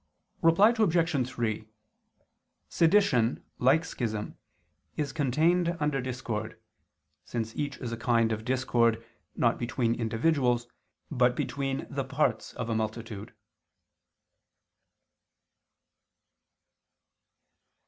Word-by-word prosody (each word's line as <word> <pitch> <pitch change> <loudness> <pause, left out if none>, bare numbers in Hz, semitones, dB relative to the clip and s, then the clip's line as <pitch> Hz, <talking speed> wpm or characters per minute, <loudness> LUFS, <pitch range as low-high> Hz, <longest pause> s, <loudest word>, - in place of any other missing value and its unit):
Reply 195 +8 +5
Obj. 165 - +2
3: 110 -3 -3 1.0
Sedition, 160 - +3 0.2
like 140 +6 +4
schism, 110 -8 -4 0.6
is 145 -3 -2
contained 165 +5 +2
under 150 -3 0
discord, 120 -4 -4 0.6
since 115 -1 -4
each 145 -1 -3
is 120 -3 -5
a 115 - -3
kind 115 -1 +2
of 110 0 -3
discord, 120 -2 +1 0.3
not 115 - +2
between 120 -1 0
individuals, 120 +1 +1 0.5
but 125 -3 +3
between 135 -1 -2
the 135 0 -3
parts 130 -4 -1
of 115 -2 -4
a 115 - -1
multitude. 110 0 -4
125 Hz, 90 wpm, -28 LUFS, 115-150 Hz, 1.0 s, Reply